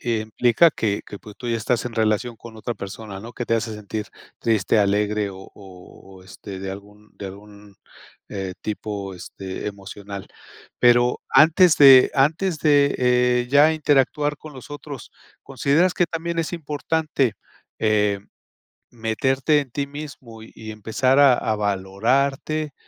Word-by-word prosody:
eh, 115 -3 0
implica 120 +8 +3
que 105 -8 -2
que, 100 - -9
pues, 105 -1 -13
tú 120 - -7
ya 115 - 0
estás 115 +2 -1
en 120 - -6
relación 110 +1 0
con 115 -1 -12
otra 120 +2 -4
persona, 100 0 -8
¿no?, 115 +3 -10
que 120 - -5
te 115 - +1
hace 115 0 -2
sentir 105 0 -6 0.3
triste, 110 -2 +1
alegre 105 0 +1
o 95 - -11 0.2
o 95 0 -15
o, - - -16
este, 95 0 -10
de 95 0 -6
algún 105 +2 -13
de 100 - -7
algún, 100 +1 -13 0.5
eh, 95 -2 -5
tipo, 105 -2 -5
este, 95 +2 -8
emocional. 100 0 -9 0.5
Pero 120 0 +4
antes 160 +4 +6
de 135 -3 +8
antes 155 +5 +1
de, 145 -2 +3
eh, 125 -1 +2
ya 145 +3 +6
interactuar 150 -1 +1
con 155 +1 -12
los 130 0 -12
otros, 145 -3 -9 0.3
¿consideras 150 +6 +1
que 175 - +2
también 165 +1 -4
es 165 - -4
importante, 150 -4 -1 0.4
eh, 105 -2 +1 0.7
meterte 130 +6 +1
en 130 - -10
ti 140 +2 -3
mismo 140 -6 -10
y - - -14
y 110 -1 -8
empezar 110 +5 0
a 140 -3 +7
a 110 -2 -1
valorarte, 125 +10 -1
115 Hz, 155 wpm, -22 LUFS, 105-140 Hz, 0.7 s, de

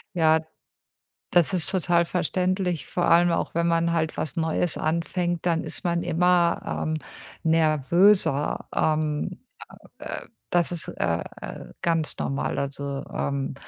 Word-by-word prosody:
Ja. 160 -2 +4 0.9
Das 175 +1 +4
ist 180 -4 +1
total 175 -2 +2
verständlich, 180 0 -1
vor 175 - -1
allem 175 +1 +5
auch - - -1
wenn 170 0 +1
man 170 0 +2
halt 160 -2 -1
was 150 -1 -3
Neues 165 +1 0
anfängt, 170 +2 -1
dann 165 -2 +1
ist 160 - -4
man 170 -1 0
immer, 175 0 +2 0.3
ähm, 155 - 0 0.5
nervöser. 160 +1 +3
Ähm, 155 -1 0 0.6
äh, - - -6 0.2
das 175 0 +1
ist, 170 - +1
äh, 85 0 -1 0.2
äh, - - -8
ganz 165 -2 0
normal, 135 0 -2
also, 140 0 -3
ähm, 140 -1 -2
165 Hz, 130 wpm, -25 LUFS, 155-175 Hz, 0.9 s, allem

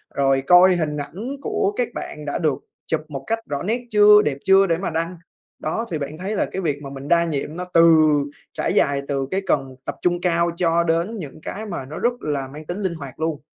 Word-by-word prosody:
rồi 135 -1 +2
coi 180 +1 +7
hình 155 -3 -1
ảnh 205 - -5
của 200 -6 0
các 245 - +1
bạn 150 - -7
đã 145 - -2
được 150 -4 0 0.3
chụp 160 -1 0
một 140 -3 -6
cách 225 0 0
rõ 140 -1 -2
nét 230 +5 -1
chưa, 210 0 +7
đẹp 140 -2 -1
chưa 195 0 +6
để 165 -1 +1
mà 190 - -3
đăng. 165 +2 -3 0.4
Đó, 220 +10 -2
thì 160 - -1
bạn 145 +2 -5
thấy 195 +4 -3
là - - +1
cái 190 - -5
việc 145 -4 -1
mà 135 - -6
mình 135 0 -8
đa 170 +1 +4
nhiệm 155 0 -3
nó 180 - -4
từ 165 0 +7 0.6
trải - - -1
dài 140 -1 +2
từ 135 -2 -1
cái 190 +1 0
cần 135 -2 0
tập - - -4
trung 175 0 +1
cao 170 -1 +2
cho 170 -1 +2
đến 170 +7 0
những 155 -1 -9
cái 215 +2 -6
mà 170 -10 -5
nó 150 - -7
rất 240 +1 +2
là 140 -3 -2
mang 150 +3 -10
tính 175 +5 -4
linh 185 - 0
hoạt 140 -4 -9
luôn. 160 -2 -2
165 Hz, 240 wpm, -22 LUFS, 145-185 Hz, 0.6 s, coi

